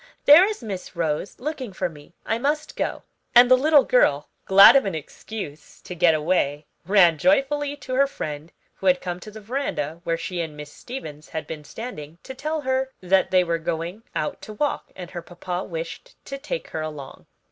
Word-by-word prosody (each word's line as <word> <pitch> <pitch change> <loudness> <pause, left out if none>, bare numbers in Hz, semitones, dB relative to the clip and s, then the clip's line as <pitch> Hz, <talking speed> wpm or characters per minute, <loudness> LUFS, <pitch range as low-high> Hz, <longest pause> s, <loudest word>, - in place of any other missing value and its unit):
there 300 +6 +9
is 425 - -5
Miss 190 -4 -6
Rose 165 +2 -2
looking 265 -5 -4
for 185 - -2
me, 155 0 -15
I 225 - -1
must 295 +4 -1
go," - - -3 0.3
and 245 +1 +8
the - - +10
little 290 +2 +5
girl, 150 - +2 0.2
glad 195 +5 +9
of 275 - +5
an 195 -4 -2
excuse 155 0 -8
to - - -7
get 175 -2 +4
away, 150 -2 0 0.2
ran 180 -6 +5
joyfully 290 +1 +2
to 260 -2 -7
her 275 +2 +4
friend 155 - -6 0.3
who 195 - -3
had 180 -1 +5
come 180 -1 -5
to 215 - -10
the 215 +1 -10
veranda, 200 - -3
where 165 -1 -1
she 175 +1 -4
and 155 -2 -6
Miss 150 0 -9
Stevens 155 - -9
had 160 - -5
been 155 -2 -7
standing, 165 -6 -8
to 265 - -8
tell 305 +4 -3
her 260 -1 0
that 190 +1 +2
they 185 -1 +4
were 170 -1 -1
going 165 +5 -4
out 150 - -3
to 215 - -9
walk, 290 +8 -2
and 180 -1 -9
her 175 - -6
papa 175 +1 -5
wished 165 -1 -7
to 275 0 -6
take - - -5
her 160 - -4
along. 150 -3 -8
185 Hz, 200 wpm, -24 LUFS, 160-260 Hz, 0.3 s, the